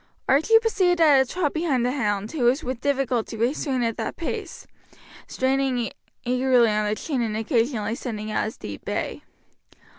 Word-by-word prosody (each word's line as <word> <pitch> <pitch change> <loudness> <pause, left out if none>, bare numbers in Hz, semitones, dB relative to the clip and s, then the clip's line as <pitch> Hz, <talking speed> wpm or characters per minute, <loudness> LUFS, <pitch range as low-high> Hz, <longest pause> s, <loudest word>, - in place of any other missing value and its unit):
Archie 315 +12 +5
proceeded 380 -6 +2
at 295 -5 +6
a 265 - -2
trot 345 -6 -1
behind 300 -7 0
the 250 - +1
hound, 210 -6 -1
who 275 -7 -1
was 260 +6 +3
with 255 -1 -4
difficulty 260 -5 -1
restrained 255 +1 0
at 230 -1 -2
that 220 - -3
pace, 370 +2 -5 0.6
straining 260 -2 0 0.3
eagerly 250 -2 +3
on 210 0 0
the 210 - 0
chain 270 +1 -2
and 220 -2 -1
occasionally 225 -1 0
sending 215 -4 -5
out - - 0
his 220 - -6
deep 100 -1 -8
bay. - - -3
255 Hz, 170 wpm, -24 LUFS, 225-285 Hz, 0.6 s, at